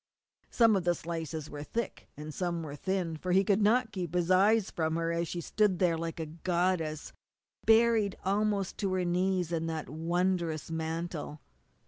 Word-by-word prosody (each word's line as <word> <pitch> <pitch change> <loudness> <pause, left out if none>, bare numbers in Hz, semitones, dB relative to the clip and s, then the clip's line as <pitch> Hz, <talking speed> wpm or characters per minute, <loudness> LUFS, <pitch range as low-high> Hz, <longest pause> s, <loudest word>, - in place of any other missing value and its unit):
Some 230 -3 +4
of 190 - 0
the 175 0 +2
slices 160 -2 -5
were 145 -1 -7
thick, 230 +10 -4
and 150 +1 -7
some 175 -1 -2
were 145 -2 -6
thin, 175 0 -2
for 180 +3 -2
he 190 +1 +5
could 200 +1 +2
not 225 +3 +3
keep 180 -4 -4
his 175 0 +1
eyes 200 +3 +4
from 160 -1 -1
her 165 0 0
as 170 0 -1
she 175 - -4
stood 205 +2 +1
there 175 -2 +2
like 165 0 -4
a 160 - -2
goddess, 165 -1 -1 0.5
buried 225 -3 +4
almost 200 -1 0
to 195 -2 0
her 185 -1 0
knees 180 0 0
in 165 -1 -1
that 160 -2 -4
wondrous 170 0 -1
mantle. 160 -1 -4
175 Hz, 175 wpm, -30 LUFS, 160-190 Hz, 0.5 s, he